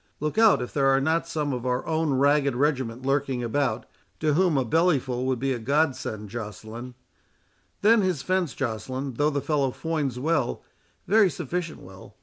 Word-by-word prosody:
Look 155 Hz, +8 st, -1 dB
out 220 Hz, -, +5 dB
if 125 Hz, -, -8 dB
there 135 Hz, -2 st, +2 dB
are 135 Hz, 0 st, +4 dB
not 160 Hz, +4 st, 0 dB
some 150 Hz, -4 st, -2 dB
of 125 Hz, -2 st, -4 dB
our 125 Hz, 0 st, -1 dB
own 160 Hz, -3 st, 0 dB
ragged 140 Hz, 0 st, +3 dB
regiment 130 Hz, -3 st, -1 dB
lurking 135 Hz, -2 st, 0 dB
about, 120 Hz, -1 st, -1 dB, 0.3 s
to 155 Hz, -1 st, +1 dB
whom 175 Hz, -2 st, +3 dB
a 130 Hz, -, +1 dB
bellyful 130 Hz, -4 st, +1 dB
would 130 Hz, -1 st, +1 dB
be 135 Hz, +2 st, 0 dB
a 120 Hz, -, -4 dB
God 140 Hz, +4 st, +1 dB
send, 110 Hz, -5 st, -6 dB
Joceline. 115 Hz, +2 st, -7 dB, 0.9 s
Then 220 Hz, +1 st, +6 dB
his 185 Hz, -7 st, -1 dB
fence, 185 Hz, -8 st, 0 dB
Joceline, 130 Hz, +2 st, -3 dB
though 145 Hz, +1 st, +3 dB
the 140 Hz, -2 st, -2 dB
fellow 140 Hz, -3 st, +1 dB
foins 145 Hz, -3 st, -2 dB
well, 145 Hz, -1 st, -1 dB, 0.4 s
very 210 Hz, 0 st, +5 dB
sufficient 170 Hz, +2 st, -4 dB
well. 95 Hz, 0 st, -13 dB
140 Hz, 175 wpm, -25 LUFS, 125-160 Hz, 0.9 s, Then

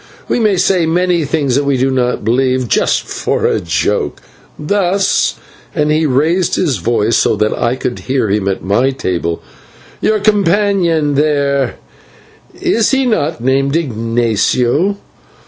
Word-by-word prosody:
We 215 Hz, -5 st, +1 dB
say 180 Hz, -2 st, +2 dB
many 175 Hz, -1 st, +1 dB
things 145 Hz, -2 st, -1 dB
that 140 Hz, +3 st, +2 dB
we 140 Hz, -1 st, +1 dB
do 135 Hz, +2 st, +1 dB
not 125 Hz, -1 st, -1 dB
believe 130 Hz, +1 st, +1 dB
just -, -, +1 dB
for -, -, -2 dB
a -, -, +1 dB
joke; 85 Hz, -5 st, -1 dB, 0.4 s
thus," 195 Hz, +4 st, +1 dB, 0.4 s
and 150 Hz, -2 st, +1 dB
he 155 Hz, +1 st, +2 dB
raised 160 Hz, +7 st, +1 dB
his 145 Hz, -, 0 dB
voice 115 Hz, +3 st, 0 dB
so -, -, +2 dB
that 105 Hz, 0 st, 0 dB
I 120 Hz, +1 st, 0 dB
could 125 Hz, -1 st, -4 dB
hear 130 Hz, -3 st, -1 dB
him 100 Hz, -1 st, -1 dB
at 95 Hz, -, -2 dB
my 105 Hz, +8 st, +1 dB
table, 90 Hz, -10 st, -3 dB, 0.6 s
"your 215 Hz, -, +2 dB
companion 195 Hz, -6 st, +1 dB
there 140 Hz, -3 st, +1 dB, 0.8 s
is 225 Hz, -1 st, +1 dB
he 270 Hz, -1 st, +1 dB
not 160 Hz, -, -1 dB
named 135 Hz, +2 st, +1 dB
Ignatio? 120 Hz, -, 0 dB
140 Hz, 140 wpm, -14 LUFS, 120-175 Hz, 0.8 s, say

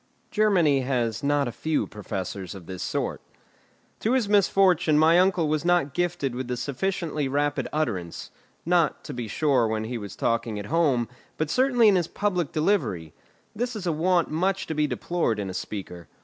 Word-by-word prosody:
Germany 180 Hz, -10 st, +3 dB
has 120 Hz, -4 st, -1 dB
not 145 Hz, -1 st, +1 dB
a -, -, -3 dB
few 155 Hz, +5 st, -1 dB
professors 95 Hz, -2 st, -6 dB
of 95 Hz, -3 st, -10 dB
this 95 Hz, 0 st, -7 dB
sort. -, -, -2 dB, 0.8 s
To 225 Hz, -, +1 dB
his 255 Hz, -5 st, +2 dB
misfortune, 185 Hz, -5 st, +4 dB
my 160 Hz, +3 st, +5 dB
uncle 180 Hz, -3 st, +3 dB
was 155 Hz, 0 st, 0 dB
not 175 Hz, -6 st, +2 dB
gifted 175 Hz, -6 st, -1 dB
with 125 Hz, 0 st, -5 dB
a 125 Hz, -, -2 dB
sufficiently 155 Hz, +2 st, -2 dB
rapid 145 Hz, +2 st, 0 dB
utterance; 105 Hz, -, -3 dB, 0.3 s
not, 170 Hz, -2 st, +2 dB
to 145 Hz, -, -7 dB
be 120 Hz, -3 st, -4 dB
sure, 130 Hz, 0 st, +2 dB
when 110 Hz, 0 st, -1 dB
he 115 Hz, +1 st, -4 dB
was 100 Hz, -2 st, -8 dB
talking 115 Hz, -2 st, -1 dB
at 105 Hz, -, -5 dB
home, 140 Hz, -9 st, +2 dB, 0.3 s
but 155 Hz, 0 st, -1 dB
certainly 250 Hz, -3 st, +4 dB
in 200 Hz, -3 st, +5 dB
his 175 Hz, -2 st, 0 dB
public 180 Hz, -7 st, -1 dB
delivery; 150 Hz, -, 0 dB, 0.4 s
this 240 Hz, +2 st, -2 dB
is 205 Hz, -4 st, -5 dB
a 170 Hz, -, +1 dB
want 170 Hz, +2 st, +1 dB
much 185 Hz, +5 st, 0 dB
to -, -, -4 dB
be 150 Hz, -1 st, +1 dB
deplored 135 Hz, -2 st, -1 dB
in 100 Hz, -2 st, -3 dB
a -, -, -7 dB
speaker. 90 Hz, -4 st, -6 dB
150 Hz, 180 wpm, -25 LUFS, 115-180 Hz, 0.8 s, my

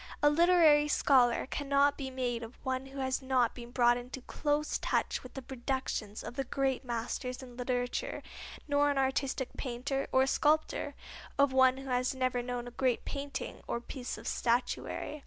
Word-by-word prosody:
A 295 Hz, -, +7 dB
literary 320 Hz, -2 st, +5 dB
scholar 255 Hz, -5 st, +4 dB
cannot 280 Hz, +1 st, +2 dB
be 270 Hz, -2 st, -5 dB
made 250 Hz, -2 st, -2 dB
of 230 Hz, +2 st, -9 dB
one 260 Hz, 0 st, -2 dB
who 270 Hz, +1 st, -11 dB
has 260 Hz, 0 st, 0 dB
not 260 Hz, -3 st, +2 dB
been 240 Hz, -1 st, -9 dB
brought 240 Hz, -1 st, +4 dB
into 250 Hz, +2 st, -7 dB
close 295 Hz, +3 st, -1 dB
touch -, -, 0 dB
with 255 Hz, -, -12 dB
the 270 Hz, -, -6 dB
productions 245 Hz, -4 st, -3 dB
of -, -, -6 dB
the 270 Hz, +2 st, -2 dB
great 270 Hz, 0 st, -1 dB
masters 250 Hz, +2 st, -3 dB
in 245 Hz, -2 st, -11 dB
literature, 245 Hz, 0 st, -2 dB, 0.4 s
nor 290 Hz, 0 st, +3 dB
an 285 Hz, -, 0 dB
artistic 265 Hz, -1 st, 0 dB
painter, 270 Hz, +2 st, -2 dB
or 260 Hz, 0 st, +4 dB
sculptor, 305 Hz, +3 st, +1 dB, 0.4 s
of 280 Hz, -1 st, +4 dB
one 260 Hz, 0 st, +5 dB
who 270 Hz, 0 st, -7 dB
has 250 Hz, +1 st, +1 dB
never 255 Hz, -1 st, 0 dB
known 245 Hz, 0 st, -4 dB
a -, -, -7 dB
great 250 Hz, -1 st, 0 dB
painting 280 Hz, 0 st, -5 dB
or 235 Hz, -, -1 dB
piece 245 Hz, +1 st, -6 dB
of -, -, -9 dB
statuary. 250 Hz, +5 st, -1 dB
260 Hz, 175 wpm, -32 LUFS, 245-280 Hz, 0.4 s, A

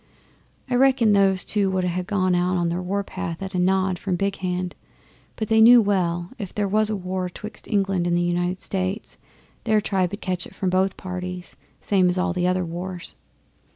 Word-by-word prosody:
I 255 Hz, -, -3 dB
reckon 255 Hz, -4 st, +4 dB
those 195 Hz, -2 st, +3 dB
two 205 Hz, -2 st, +1 dB
would 185 Hz, -1 st, 0 dB
ha' 180 Hz, 0 st, -1 dB
gone 185 Hz, -1 st, 0 dB
out 180 Hz, +1 st, +1 dB
on 170 Hz, -1 st, 0 dB
the 175 Hz, +2 st, -2 dB
war 200 Hz, +3 st, -2 dB
path 170 Hz, -3 st, -5 dB
at 190 Hz, +1 st, -6 dB
a 180 Hz, -, 0 dB
nod 185 Hz, 0 st, +1 dB
from 190 Hz, -3 st, -1 dB
Big 195 Hz, +2 st, -1 dB
Hand, 180 Hz, -1 st, -3 dB, 0.6 s
but 220 Hz, -, -3 dB
they 220 Hz, +1 st, +4 dB
knew 240 Hz, +2 st, +9 dB
well, 175 Hz, -5 st, 0 dB
if 195 Hz, -4 st, -6 dB
there 205 Hz, -1 st, 0 dB
was 215 Hz, +2 st, +2 dB
war 185 Hz, -2 st, -3 dB
'twixt 210 Hz, +4 st, -10 dB
England 195 Hz, -4 st, 0 dB
and 175 Hz, 0 st, +2 dB
the -, -, +1 dB
United 175 Hz, +1 st, -1 dB
States, 190 Hz, +2 st, -3 dB, 0.4 s
their 215 Hz, -2 st, +3 dB
tribe 190 Hz, -3 st, 0 dB
'ud 205 Hz, -, -5 dB
catch 180 Hz, -1 st, -2 dB
it -, -, -17 dB
from 185 Hz, -2 st, -1 dB
both 190 Hz, +1 st, +1 dB
parties 180 Hz, -1 st, -6 dB, 0.3 s
same 185 Hz, -3 st, +3 dB
as 180 Hz, -, -1 dB
in 180 Hz, -, +2 dB
all -, -, 0 dB
the 180 Hz, 0 st, 0 dB
other 185 Hz, 0 st, +1 dB
wars. 175 Hz, +1 st, -6 dB
185 Hz, 205 wpm, -23 LUFS, 180-200 Hz, 0.6 s, knew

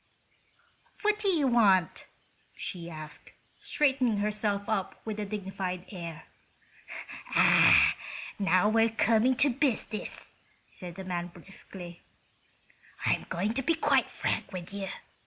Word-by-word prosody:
"What 420 Hz, 0 st, +2 dB
do 420 Hz, -, -1 dB
you 330 Hz, -7 st, +3 dB
want?" 205 Hz, -8 st, +3 dB, 0.5 s
she 170 Hz, -2 st, -6 dB
asked, 155 Hz, -2 st, -10 dB, 0.3 s
straightening 265 Hz, -6 st, +1 dB
herself 205 Hz, -1 st, -1 dB
up 205 Hz, -4 st, -2 dB
with 215 Hz, -1 st, -4 dB
a 210 Hz, -, -2 dB
dignified 190 Hz, -3 st, -4 dB
air. 170 Hz, -5 st, -7 dB, 1.1 s
"Ah!—now 190 Hz, 0 st, +4 dB
we 225 Hz, +1 st, +4 dB
are -, -, +1 dB
coming 225 Hz, +3 st, +3 dB
to 285 Hz, +3 st, +4 dB
business," 240 Hz, -4 st, -2 dB, 0.4 s
said 175 Hz, -3 st, -8 dB
the 190 Hz, -, -7 dB
man, 175 Hz, -2 st, -3 dB
briskly. 175 Hz, 0 st, -11 dB, 1.0 s
"I'm -, -, +1 dB
going 200 Hz, +6 st, -1 dB
to 265 Hz, -, -1 dB
be 330 Hz, +5 st, +1 dB
quite 320 Hz, -, +2 dB
frank -, -, -2 dB
with 185 Hz, 0 st, -7 dB
you. 200 Hz, -1 st, -4 dB
205 Hz, 120 wpm, -29 LUFS, 180-230 Hz, 1.1 s, Ah!—now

